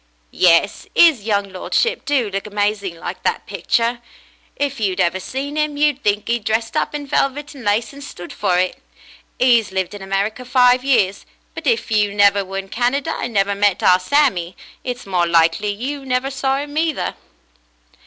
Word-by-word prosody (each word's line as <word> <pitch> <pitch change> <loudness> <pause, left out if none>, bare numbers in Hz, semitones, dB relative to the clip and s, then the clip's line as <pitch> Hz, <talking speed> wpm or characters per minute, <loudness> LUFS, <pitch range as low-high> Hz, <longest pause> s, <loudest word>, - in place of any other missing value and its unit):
"Yes, 170 -2 +3
'is 300 -11 +5
young 200 -2 0
lordship 465 - -1
do 280 -6 +1
look 195 +2 -4
amazing 205 -3 -1
like - - -6
that - - -1
pic - - -9
ture. 235 0 +1 0.6
If 280 -2 -2
you'd 195 -3 -1
ever 180 0 +1
seen 275 +8 -5
'im, 300 -1 -1
you'd 295 -2 +2
think 205 0 0
'e'd 235 -1 -1
dressed 225 +1 -1
up - - -1
in 290 -1 -4
velvet 280 +2 -1
and 270 -3 -11
lace 210 +5 0
and 280 0 -10
stood 175 -10 -9
for 180 - 0
it. 185 +9 -1 0.6
'E's 240 -5 +3
lived 190 0 -2
in 205 - -9
America 195 +5 -2
five 250 0 +4
years, 215 -8 +1 0.3
but - - -6
if 455 - 0
you 210 -2 +1
never 200 -1 +4
were 195 +1 -6
in 195 0 -5
Canada 270 +8 -1
and 240 - -3
never 200 0 +2
met 200 -2 +1
our 180 0 +5
Sammy, 185 - +1 0.3
it's 245 -1 -5
more 180 -3 +1
likely 170 +4 +2
you 270 +7 -5
never 260 +1 -1
saw 270 0 0
'im 290 +1 -7
either." 320 -2 -1
225 Hz, 185 wpm, -19 LUFS, 195-270 Hz, 0.6 s, is